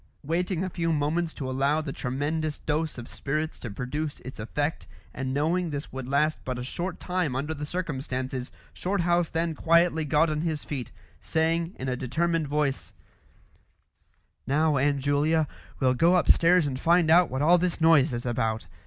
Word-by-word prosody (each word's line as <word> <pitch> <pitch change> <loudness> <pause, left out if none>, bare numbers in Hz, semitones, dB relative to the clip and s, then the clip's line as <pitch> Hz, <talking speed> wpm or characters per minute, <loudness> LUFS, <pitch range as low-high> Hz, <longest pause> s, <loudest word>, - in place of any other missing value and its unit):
Waiting 175 +4 -1
a 190 - -2
few 165 0 -1
moments 160 +2 0
to 135 - -4
allow 135 +4 +1
the 150 -3 -4
tremendous 150 +4 -2
dose 155 -1 -2
of 120 0 -7
spirits 155 +3 -3
to 120 - -6
produce 145 +8 -4
its 130 - -9
effect, 145 +8 -2 0.3
and 130 0 -3
knowing 165 +5 0
this 145 0 -5
would 130 -1 -5
last 150 +3 +1
but 130 -1 -3
a 125 - -4
short 175 +8 -4
time 180 -7 -1
under 145 +4 -2
the 150 -1 -6
circumstances, 130 -6 -3 0.2
Shorthouse 175 -3 +1
then 165 0 -1
quietly 165 +1 +3
got 150 +2 +2
on 150 0 -1
his 160 -3 -2
feet, 130 -6 -5 0.3
saying 165 +2 0
in 130 - -5
a 130 - 0
determined 160 +5 0
voice 145 -1 -1 1.5
"Now, 150 +2 +2
Aunt 140 +1 +1
Julia, 150 +3 +2 0.3
we'll 130 -1 +3
go 170 +8 +4
upstairs 175 0 +5
and 130 -2 -3
find 170 0 +3
out 175 +1 +6
what 130 +3 -1
all 175 +3 +6
this 180 -1 -1
noise 160 -3 +5
is 120 0 -4
about. 115 -2 -1
150 Hz, 170 wpm, -27 LUFS, 135-165 Hz, 1.5 s, out